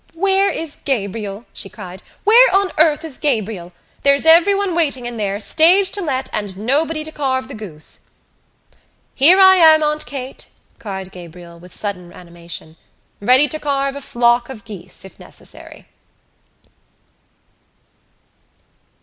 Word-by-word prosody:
"Where 390 +2 +1
is 320 -3 -5
Gabriel?" 210 -3 -4
she 195 - -6
cried. 190 -2 -11 0.2
"Where 460 +1 +5
on 390 -1 +2
earth 315 0 +3
is 300 -5 -8
Gabriel? 215 - -2 0.3
There's 280 +2 +3
everyone 370 +4 +4
waiting 285 -7 -1
in 240 -1 -6
there, 200 -1 -3
stage 350 - +4
to 405 - -4
let, 270 -6 -2
and 200 -3 -4
nobody 305 +8 0
to 315 - -9
carve 260 -3 -2
the 275 - -9
goose!" 175 -8 -9 1.0
"Here 335 +8 +7
I 380 0 +7
am, 315 -2 +6
Aunt 300 0 -2
Kate!" 265 -2 -7 0.3
cried 190 -3 -7
Gabriel, 170 -1 -13
with 180 +1 -15
sudden 180 -4 -6
animation, 170 -2 -10 0.4
"ready 255 +7 +4
to 310 - -3
carve 275 -2 -2
a 280 - -7
flock 240 -1 +1
of 230 -5 -10
geese, 205 -3 -9
if 190 - -15
necessary." - - -13
260 Hz, 135 wpm, -17 LUFS, 200-315 Hz, 1.0 s, Here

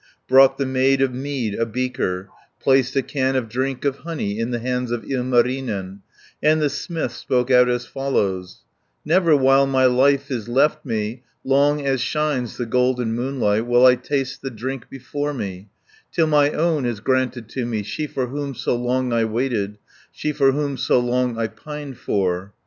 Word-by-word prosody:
Brought 135 +1 +6
the 140 - -1
maid 130 +1 +2
of 130 -2 0
mead 130 -4 -3
a 115 - 0
beaker, 110 -6 -2 0.3
Placed 135 -1 +2
a 135 - +2
can 135 -2 -1
of 130 -3 0
drink 130 +4 -3
of 140 -1 0
honey 135 -11 -4
In 115 +1 -1
the 120 - -1
hands 125 +1 -2
of 120 -1 -3
Ilmarinen, 125 -6 -1 0.4
And 155 +1 +4
the 150 -2 +1
smith 160 -3 -3
spoke 125 +1 -1
out 125 -1 +6
as 120 0 -1
follows: 100 -10 -2 0.4
"Never 165 -1 +4
while 135 0 +4
my 130 -1 +3
life 135 +2 +3
is 120 -3 -3
left 150 +5 +2
me, 115 -1 -3 0.2
Long 140 +2 +2
as 135 -2 +1
shines 140 -3 -1
the 120 - -2
golden 125 -1 +1
moonlight, 120 -4 0
10 120 - -7
Will 120 +1 +5
I 130 - +8
taste 130 +1 -3
the 135 - -4
drink 130 +2 -6
before 145 +2 -4
me, 95 -3 -6 0.4
Till 165 - +2
my 150 -2 +4
own 155 -1 0
is 115 -4 -3
granted 130 -1 -1
to 125 0 -3
me, 110 -3 -2
She 150 +9 -4
for 130 -3 -2
whom 140 +1 -5
so 120 - -1
long 125 +1 -1
I 115 -1 +2
waited, 110 -3 -2 0.3
She 150 - -3
for 140 -2 +3
whom 140 -1 -2
so - - +2
long 125 -1 0
I 115 - 0
pined 145 +4 -8
for." 95 0 -1
130 Hz, 185 wpm, -21 LUFS, 120-140 Hz, 0.4 s, I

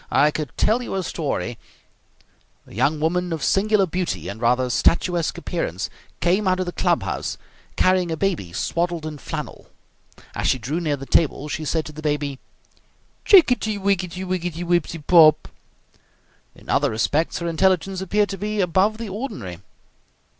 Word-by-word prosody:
I 150 +1 +4
could 150 -3 -4
tell 225 +4 +2
you 240 - -5
a 190 - -1
story 140 -8 -3 0.6
" - - -37
A - - -16
young 140 +8 +1
woman 175 +3 0
of 160 -3 -3
singular 205 0 +3
beauty 180 0 -3
and 110 +3 -7
rather 125 +2 +2
statuesque 170 +4 +1
appearance 165 - -3 0.3
came 190 +4 +2
out 185 0 +2
of 185 - 0
the 175 - -4
club - - +1
house - - -3 0.4
carrying 185 -1 +2
a 160 - -2
baby 170 - -1
swaddled 170 - -2
in 150 -2 -6
flannel. - - -6 0.7
As - - -2
she 130 - +3
drew 135 +7 -3
near 150 -4 -1
the 135 - -8
table 150 0 +1
she 155 +1 -4
said 160 +1 -1
to 155 - -8
the 155 +1 -9
baby: 145 -3 -2 0.9
"Chicketty 250 - +5
wicketty 190 -2 -1
wicketty 175 -2 -3
wipsey 175 -1 0
pop!" 155 -1 +5 1.1
In - - -18
other - - +2
respects 145 +9 0
her 170 - -3
intelligence 185 +2 +1
appeared 205 +2 +1
to 195 - -5
be 210 +1 -2
above 190 +4 +2
the 230 -1 -5
ordinary. 160 - -6
170 Hz, 165 wpm, -22 LUFS, 150-190 Hz, 1.1 s, Chicketty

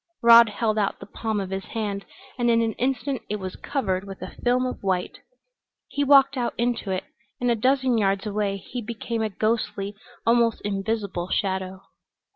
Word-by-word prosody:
Rod 235 -1 +9
held 215 +1 0
out 200 - 0
the - - -9
palm 220 0 -3
of 190 -1 -4
his 190 0 -3
hand 205 -3 -3 0.3
and 240 -1 +1
in 230 0 +4
an 225 -1 0
instant 265 +1 -1
it 210 - -1
was 190 -3 -5
covered 190 -10 -2
with 195 -1 -9
a - - -8
film 250 +1 +3
of 255 - -4
white. 185 -2 -1 0.7
He 285 - 0
walked 275 -1 +6
out 240 -1 -1
into 235 -3 -1
it, 185 0 -1 0.4
and 245 -1 +2
a - - +3
dozen 255 +1 +2
yards 195 0 +1
away 205 -1 -1
he 240 +5 -6
became 230 0 -4
a 220 - 0
ghostly, 210 -1 -1 0.3
almost 230 -1 +3
invisible 200 -3 -2
shadow. 190 -1 -1
220 Hz, 180 wpm, -25 LUFS, 195-240 Hz, 0.7 s, Rod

